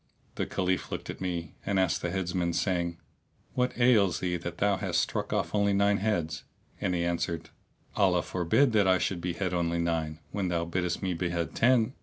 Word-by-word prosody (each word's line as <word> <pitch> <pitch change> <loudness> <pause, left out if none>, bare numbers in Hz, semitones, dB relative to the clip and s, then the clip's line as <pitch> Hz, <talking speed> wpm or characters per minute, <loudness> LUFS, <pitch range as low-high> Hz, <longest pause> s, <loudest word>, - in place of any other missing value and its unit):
The - - -2
Caliph 95 0 -1
looked - - -4
at - - -11
me 85 -3 -3
and 100 -1 0
asked 95 -3 +1
the 85 - -1
Heads 90 -1 -2
man, 85 -2 0
saying, 85 -2 0 0.6
"What 125 0 0
ails 110 -7 +4
thee 90 -1 -1
that 85 - -6
thou 100 -1 +2
hast - - 0
struck - - -1
off - - -1
only 100 -1 +3
nine 100 +1 +3
heads?"; 85 -8 -1 0.4
and 90 -2 0
he 85 0 0
answered, 85 -1 -2 0.4
"Allah - - +3
forbid 95 +10 +2
that 105 -3 +3
I 95 0 +5
should 90 -1 -1
behead 90 +1 -2
only 85 -1 0
nine, 80 -2 -1
when 100 -2 -1
thou 85 -1 0
biddest 90 +1 -2
me 95 -1 0
behead 85 -1 -2
ten!" 120 0 +3
90 Hz, 195 wpm, -29 LUFS, 85-100 Hz, 0.6 s, I